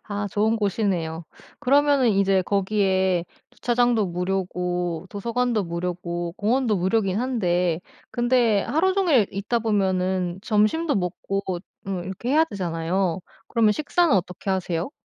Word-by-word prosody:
아 205 0 -3
좋은 215 +2 +1
곳이네요. 185 -6 -1 0.3
그러면은 280 -1 +3
이제 195 -1 +3
거기에 190 -3 +1 0.3
주차장도 240 -3 +1
무료고 180 -1 -2
도서관도 235 0 -1
무료고 170 0 -4
공원도 230 0 +1
무료이긴 190 +1 +1
한데 180 -9 0 0.3
근데 240 -4 +2
하루 370 +6 +1
종일 315 - +3
있다 205 +5 -1
보면은 190 -4 0
점심도 240 +10 +1
먹고 195 +1 -2 0.5
음 185 -3 -3
이렇게 190 +6 -6
해야 315 +3 +5
되잖아요. 180 - -2 0.3
그러면 220 -3 +3
식사는 305 - +2
어떻게 180 0 -2
하세요? 185 - -1
195 Hz, 305 characters per minute, -24 LUFS, 180-235 Hz, 0.5 s, 해야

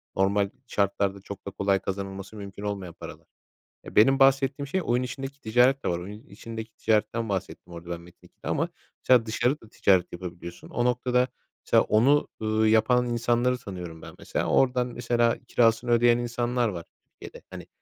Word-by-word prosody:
normal 100 +1 +2 0.2
şartlarda 100 -1 0
çok 100 0 -9
da - - -4
kolay 100 0 +1
kazanılması 95 +1 -6
mümkün 100 0 -8
olmayan 100 -4 -4
paralar. - - -11 0.6
Eee, - - -11
benim 135 +6 +5
bahsettiğim 135 +1 +3
şey, 190 +6 -1
oyun 125 -1 +1
içindeki 135 +2 -6
ticaret 125 +5 +3
de - - +2
var. 85 0 -1
Oyunun 105 +4 -9
içindeki 110 +2 -8
ticaretten 110 +1 0
bahsettim 95 -2 -5
orada 85 +1 -10
ben 85 -1 -4
Metin2'de 90 - -15
ama - - 0 0.3
mesela 125 -3 +5
dışarı 120 +6 0
da 110 - -16
ticaret 95 -5 +2
yapabiliyorsun. 85 -1 -8
O 120 - -1
noktada 125 0 +2 0.4
mesela - - +4
onu, 135 +8 +3
ııı, 110 0 +2
yapan 110 +3 +4
insanları 120 +1 +1
tanıyorum 90 -8 -8
ben - - -11
mesela. - - -2
Oradan 125 -1 +3
mesela 120 -1 +1
kirasını 115 +1 +2
ödeyen 120 0 +5
insanlar 120 0 -1
var 85 -4 -6 0.2
Türkiye'de. - - -13
Hani, - - -9
110 Hz, 165 wpm, -26 LUFS, 100-125 Hz, 0.6 s, benim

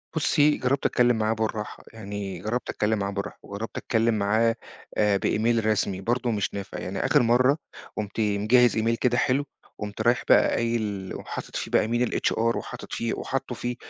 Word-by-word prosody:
بُصي، 150 -1 +3
جرَّبت 130 +2 0
أتكلَّم 120 -1 +3
معاه 110 0 +1
بالراحة، 110 -1 -3
يعني 100 -4 -6
جرَّبت 110 +6 -3
أتكلَّم 105 0 0
معاه 100 0 -1
بالراحة، 100 0 -5
وجرَّبت 100 +3 -6
أتكلَّم 115 -1 +1
معاه 110 +2 +2 0.4
آآ، 105 -2 +3
بemail 115 +3 +1
رسمي 100 -3 0
برضه، 120 +3 0
مش 105 -3 -1
نافع. 100 -2 -6
يعني. - - -3
آخِر - - +4
مرَّة 125 +4 +4 0.4
قُمت 105 0 -4
مجهِّز 110 +3 +3
email 115 +1 +2
كده 125 -1 +2
حلو، 135 +3 +2 0.3
قُمت 105 -1 -5
رايِح 120 +1 +2
بقى - - +6
قايِل 110 -5 -2
وحاطط - - -7
فيه - - -3
بقى - - +3
email 120 +2 +1
الHR 115 +1 +1
وحاطط - - -7
فيه 115 0 -1
وحاطِّه 135 -2 -3
فيه، 120 +1 -3
110 Hz, 175 wpm, -26 LUFS, 105-120 Hz, 0.4 s, بقى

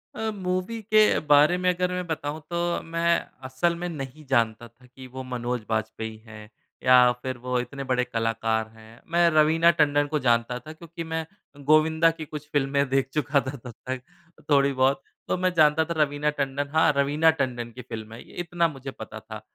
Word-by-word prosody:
अ, 220 0 -2
movie 185 +4 -3
के 215 0 +4
बारे 150 +4 +5
में 180 0 +1
अगर 180 +1 -1
मैं 180 0 -3
बताऊँ, 155 -1 -3
तो 170 0 -1
मैं 170 +1 +1 0.3
असल 170 +7 0
में 175 +1 -4
नहीं 150 -1 -7
जानता 115 -2 +1
था 120 +2 -23
कि 130 +1 -13
वो 130 +1 -8
मनोज 125 -1 -3
बाजपेयी 110 0 -3
हैं 105 -1 -11 0.3
या 125 -1 +6
फिर 130 -1 -3
वो 125 0 -2
इतने 135 +3 -5
बड़े 125 -1 +1
कलाकार 115 -2 -1
हैं। 110 +1 -16
मैं 170 0 +4
रवीना 160 +2 +5
टंडन 145 -2 +2
को 150 0 -1
जानता 120 -1 +1
था 155 +3 -10
क्योंकि 170 +1 -9
मैं 160 0 -3 0.4
गोविंदा 160 +2 +4
की 155 - -5
कुछ 150 0 -8
फ़िल्में 140 0 +1
देख 135 0 +1
चुका 145 -1 +2
था 130 +1 -6
तब 120 0 -10
तक, 130 -1 -3 0.5
थोड़ी 140 -1 +4
बहुत, 130 +2 +2 0.3
तो - - 0
मैं 185 0 0
जानता 155 0 +4
था 170 - -3
रवीना 145 +1 +1
टंडन 140 +1 -1
हाँ, 160 -1 +4
रवीना 145 +3 +3
टंडन 120 -3 -2
की 125 - -9
फ़िल्म 110 -2 -8
है 115 - -11
ये, - - -16
इतना 175 -1 0
मुझे 135 -3 -8
पता 110 -1 -9
था। 110 0 -10
140 Hz, 195 wpm, -25 LUFS, 125-160 Hz, 0.5 s, या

